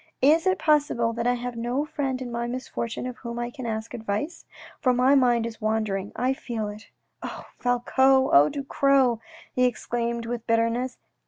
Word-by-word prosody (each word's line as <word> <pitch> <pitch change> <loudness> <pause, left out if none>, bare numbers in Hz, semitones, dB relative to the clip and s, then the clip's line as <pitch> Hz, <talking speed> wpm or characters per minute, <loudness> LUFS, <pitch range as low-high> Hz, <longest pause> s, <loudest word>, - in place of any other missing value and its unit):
" - - -51
Is 330 +3 0
it 375 - +3
possible 290 -7 +2
that 235 +1 -1
I 245 - +3
have 245 0 -5
no 240 +5 -1
friend 270 -4 -2
in 245 - -6
my 235 0 -2
misfortune 240 -2 -4
of 250 -1 -5
whom 235 -2 -6
I 240 0 -3
can 255 -2 -6
ask 220 0 -4
advice? 225 - -3 0.3
for 255 -2 +2
my 255 +3 +4
mind 245 -4 +4
is 230 -1 -7
wandering, 215 -2 -1
I 255 +2 +1
feel 230 -5 -4
it. 210 +1 -10 0.2
" - - -49
Oh, - - -7
Falcoz! 265 +2 +3
oh, 145 +2 +7
Ducros! 275 -3 +2 0.2
" - - -21
he 250 - +4
exclaimed 235 -1 -2
with 235 0 -5
bitterness. 230 +2 +1
240 Hz, 190 wpm, -25 LUFS, 230-260 Hz, 0.3 s, oh